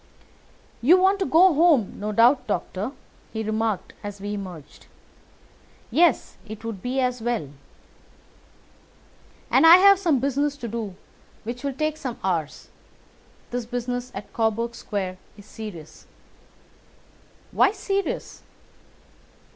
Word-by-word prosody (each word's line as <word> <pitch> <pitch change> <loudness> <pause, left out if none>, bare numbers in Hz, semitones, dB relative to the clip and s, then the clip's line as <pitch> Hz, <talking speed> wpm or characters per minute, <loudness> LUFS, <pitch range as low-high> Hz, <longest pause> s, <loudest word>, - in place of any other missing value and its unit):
"You 320 +10 +6
want 385 +2 +3
to 385 - 0
go 355 +2 +6
home, 300 - +3
no 210 +1 -3
doubt, 240 +5 +4
Doctor," 205 +2 -3 0.4
he 220 0 -3
remarked 220 -1 -2
as 205 -1 -7
we 205 +1 -4
emerged. 180 -7 -9 1.0
"Yes, 340 0 +2
it 220 0 -10
would 220 -5 -5
be 255 +4 -2
as 250 -2 0
well." 230 - -2 2.0
"And - - +5
I 335 - +11
have 395 0 +6
some 335 -7 +2
business 280 +2 -1
to 240 - -6
do 220 -4 -5 0.5
which 235 +4 -6
will 280 -1 -2
take 310 +2 -2
some 255 -6 -5
hours. 165 -6 -2 0.8
This 245 -1 -3
business 245 +1 -4
at 195 - -8
Coburg 230 +1 0
Square 190 -5 -4 0.2
is 205 - -14
serious." 210 -9 -10 1.4
"Why - - +4
serious?" 395 -1 -3
235 Hz, 125 wpm, -24 LUFS, 210-285 Hz, 2.0 s, I